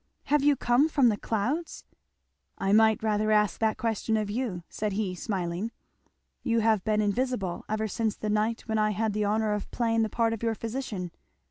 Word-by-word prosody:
"Have 295 0 +2
you 290 0 +5
come 255 +5 +3
from 275 -6 +4
the 215 - +1
clouds?" 245 +12 -2 0.7
"I 195 +1 0
might 220 +1 +4
rather 215 0 +1
ask 210 -1 +2
that 220 -1 +1
question 220 -1 0
of 210 -1 -2
you," 215 -7 -3
said 210 -2 -3
he 195 -2 -1
smiling. 185 +2 -3 0.7
"You 230 -3 +1
have 220 -3 +2
been 215 0 +1
invisible 210 -3 -1
ever 215 +1 -1
since 220 +1 -1
the 215 - -4
night 215 +2 0
when 220 -1 -2
I 215 0 +2
had 215 +1 -1
the 210 0 0
honour 215 +1 +1
of 210 - -4
playing 230 -1 +1
the 220 - +1
part 230 +1 +1
of 225 - -5
your 230 -1 0
physician." 220 -6 -4
220 Hz, 195 wpm, -28 LUFS, 210-230 Hz, 0.7 s, you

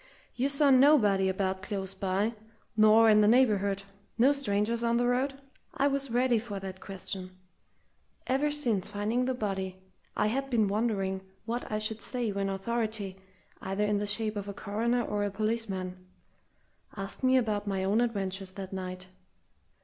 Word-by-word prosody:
"You 260 +3 +1
saw 280 0 +4
nobody 245 -9 +5
about 190 0 -1
close 190 0 -4
by 195 +3 0 0.4
nor 215 +1 +6
in 215 -1 +6
the 210 - +5
neighbourhood 205 -5 +3 0.3
no 260 +5 +5
strangers 230 -3 0
on 235 0 +2
the 245 - +2
road?" 265 +3 0 0.4
I 275 - +1
was 275 -1 -2
ready 245 0 +2
for 210 -3 -6
that 190 -1 -7
question. 185 -1 -6 0.9
Ever 275 +3 +1
since 240 -10 0
finding 220 +5 0
the 260 0 -1
body, 190 -4 -3 0.4
I 210 - +2
had 270 +5 -1
been 225 -5 +2
wondering 195 -3 -1 0.2
what 235 +1 -4
I 215 - 0
should 215 +1 -2
say 245 -3 -2
when 195 0 -1
authority, 205 -1 -2 0.4
either 195 +2 -1
in 210 -1 +1
the 205 - -2
shape 215 +1 -1
of 205 0 -4
a 200 - -6
coroner 230 +4 0
or 205 -2 -1
a 205 - 0
policeman, 195 -3 -2 0.9
asked 195 +6 -6
me 260 0 +5
about 210 -4 0
my 195 -1 -1
own 205 +4 +2
adventures 195 -5 -2
that 195 -1 -7
night. 185 -1 -5
210 Hz, 165 wpm, -29 LUFS, 195-240 Hz, 0.9 s, nor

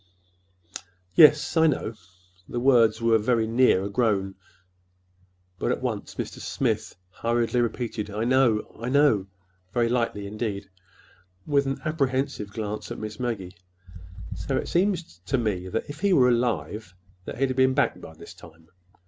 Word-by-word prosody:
"Yes, 150 - +6
I 160 0 +5
know." 130 -6 -1 0.6
The 120 - -2
words 120 -3 +4
were 115 -1 +4
very 115 +1 +1
near 115 -4 +3
a 100 - -3
groan, 100 -4 +1 1.3
but - - 0
at - - -2
once - - -3
Mr. - - -5
Smith - - -2 0.2
hurriedly 120 +4 0
repeated, 115 -2 -3
"I 105 +2 -3
know—I 120 -2 +1
know!" 135 -8 +3 0.4
very 120 +1 +1
lightly, 115 -4 -1
indeed, 100 -1 -4 0.7
with 140 -2 +2
an 135 0 -2
apprehensive 135 -8 -1
glance 105 0 -5
at - - -6
Miss 110 -1 -7
Maggie. 105 -8 -3 0.8
"So 135 - -2
it - - -3
seems 175 - 0
to 135 - +1
me 100 -6 -2
if 145 +10 -4
he 200 +1 +2
were 125 -6 +5
alive 110 -5 -1 0.3
that - - -6
he'd 130 0 0
be 130 0 +5
back 130 +2 0
by 80 - -11
this - - -12
time. 80 0 -17
115 Hz, 145 wpm, -25 LUFS, 105-130 Hz, 1.3 s, Yes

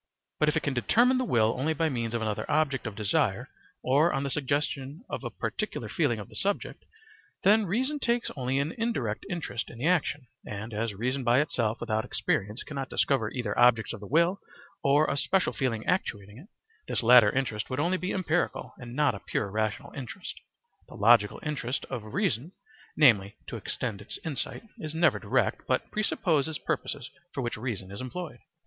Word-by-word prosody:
But 150 - +4
if 150 - +1
it - - -1
can 140 - 0
determine 240 - +3
the - - +1
will 115 - +3
only 155 +4 +1
by 160 +2 +2
means 120 -5 -2
of 115 - -1
another 105 -2 -2
object 140 -5 +1
of 105 - -6
desire 105 -1 0 0.3
or 145 +6 +4
on 135 - -1
the 140 - -2
suggestion 145 - -2
of - - -5
a - - -3
particular - - -4
feeling - - +1
of - - -7
the - - -17
subject, - - -2 0.6
then 210 +1 +5
reason 260 - 0
takes 240 -2 0
only 130 -1 -1
an 140 +3 0
indirect 135 - -1
interest 170 - -3
in - - -11
the 125 - -3
action, 165 -5 +1 0.2
and, 105 +2 -6
as 105 0 -2
reason 125 +6 -1
by 120 +2 +4
itself 115 -7 0
without 110 0 -1
experience 105 +5 -1
cannot 135 -3 -5
discover 125 -6 +1
either 120 -5 -3
objects 120 -2 +5
of 115 - -7
the 105 - -9
will 170 - +3 0.4
or 145 +2 +5
a - - 0
special 185 +6 +1
feeling 115 -5 -1
actuating 105 - -2
it, 170 - -14 0.4
this - - -1
latter 120 -2 +8
interest 115 -5 -1
would 130 +1 -2
only 175 +5 +2
be 185 - -2
empirical 175 -2 -1
and 120 -1 -8
not 145 -3 +3
a 100 - -6
pure 100 0 -2
rational 110 +6 -2
interest. 130 -4 -6 0.6
The - - -11
logical 105 0 +5
interest 140 -4 -2
of 115 -3 -4
reason 170 - -1 0.4
(namely, 105 -9 +5
to - - -6
extend 110 -5 -3
its 105 - -7
insight) 155 - -3 0.2
is 155 0 -5
never 170 +1 +3
direct, - - 0
but - - 0
presupposes 160 -7 +1
purposes 140 -4 -3 0.3
for 140 - -1
which 120 - -2
reason 105 -5 -4
is 100 - -6
employed. 130 0 -6
135 Hz, 190 wpm, -28 LUFS, 115-160 Hz, 0.6 s, latter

